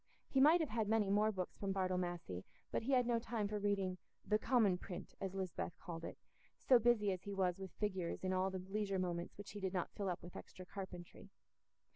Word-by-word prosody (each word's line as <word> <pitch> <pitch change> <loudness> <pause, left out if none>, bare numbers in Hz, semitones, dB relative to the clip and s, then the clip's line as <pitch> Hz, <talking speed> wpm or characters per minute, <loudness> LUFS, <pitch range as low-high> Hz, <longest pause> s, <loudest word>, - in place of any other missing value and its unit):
He 270 - +3
might 320 +5 +7
have 310 - -1
had 220 -1 +1
many 210 -2 +3
more 210 +2 +4
books 185 -3 -4
from 195 -1 0
Bartle 185 -1 +1
Massey, 175 - -3 0.3
but - - +1
he 265 +5 0
had 250 -1 +5
no 235 -1 +2
time 230 -3 -1
for 210 0 -2
reading 195 -3 0 0.3
"the 210 0 +3
commin 215 -7 +4
print," 180 -1 -7
as 195 0 -3
Lisbeth 185 -3 -3
called 165 -1 -6
it, - - -6 0.4
so 255 -2 +6
busy 225 -3 +4
as 185 -2 -3
he 200 +1 -5
was 185 -1 +1
with 190 -1 -5
figures 190 -5 -2
in 185 0 +1
all 185 +1 +2
the 190 - -3
leisure 200 -1 0
moments 175 -2 -2
which 205 0 -8
he 205 - -6
did 190 -1 -2
not 180 -2 -1
fill 200 -2 -2
up 175 - -3
with 175 - -9
extra 185 - -9
carpentry. 180 -2 -8
195 Hz, 225 wpm, -39 LUFS, 185-215 Hz, 0.4 s, might